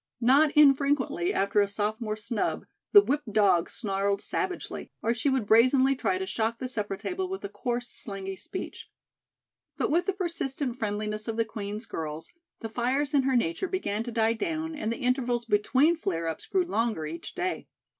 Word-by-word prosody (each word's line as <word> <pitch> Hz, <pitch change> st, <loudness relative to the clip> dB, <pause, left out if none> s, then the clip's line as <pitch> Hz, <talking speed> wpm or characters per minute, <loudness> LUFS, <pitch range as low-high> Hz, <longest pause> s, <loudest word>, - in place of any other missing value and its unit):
Not 270 Hz, +6 st, +5 dB
infrequently 280 Hz, -10 st, +4 dB
after 200 Hz, +1 st, +2 dB
a 200 Hz, -, +2 dB
sophomore 215 Hz, +2 st, -2 dB
snub, 225 Hz, +1 st, -2 dB, 0.3 s
the 410 Hz, -1 st, +9 dB
whipped 285 Hz, -, -1 dB
dog 195 Hz, -5 st, +3 dB
snarled 200 Hz, -2 st, -1 dB
savagely; 375 Hz, -, -4 dB
or 230 Hz, -, +2 dB
she 240 Hz, +4 st, 0 dB
would 265 Hz, -5 st, +1 dB
brazenly 255 Hz, +5 st, +5 dB
try 370 Hz, -, 0 dB
to 380 Hz, -, -3 dB
shock 230 Hz, -9 st, -1 dB
the 255 Hz, -, -4 dB
supper 210 Hz, -5 st, -3 dB
table 370 Hz, -, -3 dB
with 385 Hz, +1 st, -5 dB
a -, -, -4 dB
coarse, 245 Hz, -5 st, -3 dB
slangy 195 Hz, -4 st, -6 dB
speech. -, -, -7 dB, 0.9 s
But -, -, 0 dB
with 345 Hz, +5 st, +2 dB
the 390 Hz, -, +2 dB
persistent 285 Hz, -9 st, -3 dB
friendliness 215 Hz, 0 st, -3 dB
of 225 Hz, -1 st, -3 dB
the 230 Hz, -, +2 dB
Queen's 210 Hz, 0 st, -6 dB
girls, 155 Hz, 0 st, -5 dB, 0.3 s
the 225 Hz, -, -3 dB
fires 260 Hz, +6 st, 0 dB
in 280 Hz, -, +5 dB
her 265 Hz, 0 st, +1 dB
nature 235 Hz, -, 0 dB
began 285 Hz, -, -2 dB
to 240 Hz, +1 st, -5 dB
die 225 Hz, 0 st, +2 dB
down 320 Hz, +7 st, -3 dB
and 225 Hz, -7 st, -2 dB
the 230 Hz, -, -3 dB
intervals 245 Hz, -2 st, 0 dB
between 255 Hz, +10 st, +3 dB
flare 170 Hz, -, -2 dB
ups 160 Hz, -, -5 dB
grew 375 Hz, -2 st, +1 dB
longer 225 Hz, -, -1 dB
each 160 Hz, +2 st, -7 dB
day. 365 Hz, 0 st, -2 dB
235 Hz, 180 wpm, -28 LUFS, 210-285 Hz, 0.9 s, the